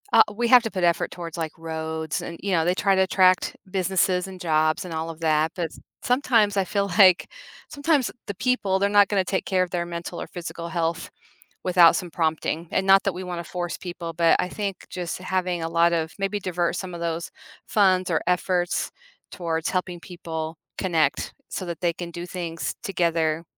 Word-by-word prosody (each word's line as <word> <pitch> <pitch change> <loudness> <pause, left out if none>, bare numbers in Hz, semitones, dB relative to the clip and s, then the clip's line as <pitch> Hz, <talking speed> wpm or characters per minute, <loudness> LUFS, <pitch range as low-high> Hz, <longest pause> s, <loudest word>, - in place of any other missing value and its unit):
Uh, - - +9
we 240 +2 0
have 245 0 +7
to 225 - -3
put 185 -2 -2
effort 170 -1 +2
towards 170 -1 -7
like 160 -2 -4
roads 160 -1 -4
and, 170 - -7
you 200 - -1
know, 165 -3 +2
they 180 - +3
try 195 +1 +2
to 190 - +3
attract 185 -1 +3
businesses 185 -1 +1
and 185 -1 -10
jobs 155 -2 +2
and 180 -2 -7
all 160 +1 -3
of 165 -1 -8
that. 155 0 +2
But 170 -4 -3 0.3
sometimes 230 -5 +2
I 195 - +2
feel 200 +2 0
like 185 -3 +6 0.4
sometimes 285 -3 +1 0.2
the 200 - -4
people, 205 -3 +1
they're 200 +1 +1
not 205 -1 +6
gonna 195 -2 +1
take 190 +1 -2
care 185 -1 +2
of 180 - -5
their 175 -1 -2
mental 170 0 -6
or - - -6
physical 170 -1 -6
health 165 0 -2 0.5
without 175 -2 +6
some 180 - -3
prompting. 160 0 -1
And 190 - 0
not 195 0 +7
that 195 - 0
we 185 +2 -6
wanna 175 -1 -4
force 175 0 -4
people, 175 -2 -6
but 170 0 +4
I - - +1
think 200 -1 -4
just 175 -3 -4
having 185 -1 -1
a 165 - -2
lot 170 +1 +3
of 160 -1 -1
maybe 195 +1 -1
divert 180 -3 -1
some 185 -2 -5
of 170 - -7
those 170 0 -2 0.4
funds 185 -3 +3
or 165 - +1
efforts 180 0 0 0.4
towards 165 -2 -2
helping 180 -1 -2
people 165 -2 -6 0.2
connect 170 -5 0 0.2
so 185 - -4
that 170 -1 -6
they 175 -1 +1
can 175 0 -7
do 170 +1 -6
things 170 -2 -4
together, 165 -4 0
175 Hz, 200 wpm, -24 LUFS, 165-190 Hz, 0.5 s, Uh